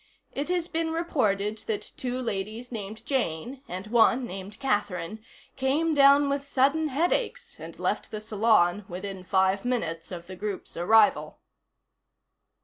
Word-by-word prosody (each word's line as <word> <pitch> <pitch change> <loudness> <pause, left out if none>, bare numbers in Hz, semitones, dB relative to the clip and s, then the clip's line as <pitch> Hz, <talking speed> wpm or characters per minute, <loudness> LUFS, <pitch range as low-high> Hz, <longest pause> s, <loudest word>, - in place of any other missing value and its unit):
It 285 +4 -3
has 355 -2 0
been 330 -1 -1
reported 215 - 0
that 215 -2 -3
two 250 0 -3
ladies 225 +1 -4
named 220 0 -6
Jane, 250 - -2
and 185 +2 -5
one 235 +3 +4
named 195 -1 -8
Catherine, 210 -5 -2 0.3
came 290 +5 +1
down 280 0 +6
with 280 0 -1
sudden 280 +3 +2
headaches 410 - -1
and - - -9
left - - -1
the 215 - -5
salon 210 -3 +2
within 190 +1 -6
five 190 +1 +2
minutes 170 -10 -2
of 170 -2 -7
the 185 +1 -9
group's 200 +1 -5
arrival. 220 +10 +3
225 Hz, 140 wpm, -27 LUFS, 195-275 Hz, 0.3 s, down